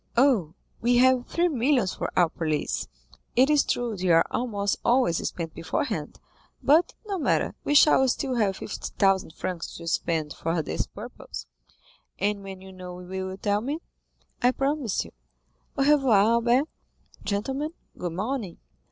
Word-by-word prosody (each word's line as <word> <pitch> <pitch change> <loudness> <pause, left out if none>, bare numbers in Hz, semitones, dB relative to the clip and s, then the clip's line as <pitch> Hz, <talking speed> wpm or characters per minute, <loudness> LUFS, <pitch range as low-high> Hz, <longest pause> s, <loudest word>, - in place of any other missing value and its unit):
"Oh, 230 - +3 0.3
we 240 +1 +3
have 255 0 +4
three 345 +1 +1
millions 255 - +2
for - - -3
our 175 -2 +6
police; 155 -2 -2 0.5
it 265 +4 +5
is 295 -1 +5
true 240 -3 -1
they 185 -1 -1
are 165 -1 +6
almost 205 -5 -1
always 240 -9 +3
spent 165 -2 -5
beforehand, 165 - -3 0.4
but, 315 +5 +4
no 400 -3 -3
matter, - - +1
we 290 - +1
shall 285 -2 +6
still 260 +1 0
have 210 -5 +1
fifty - - -5
thousand 195 -5 +2
francs 175 -3 -4
to 170 - -9
spend 160 -2 -1
for 165 0 -1
this - - -2
purpose." - - -9 0.7
"And 205 +1 0
when 195 -1 -8
you 190 0 -11
know, 180 -1 -8
will 180 +1 -10
you 190 0 -4
tell 205 +1 0
me?" 280 +6 -2 0.6
"I 245 - +5
promise 270 -4 0
you. - - -12 0.7
Au 275 - +3
revoir, 270 -6 +5
Albert. 235 +6 +3 0.6
Gentlemen, 265 +9 -2 0.3
good 175 -2 -4
morning." 210 0 -3
210 Hz, 155 wpm, -26 LUFS, 180-265 Hz, 0.7 s, our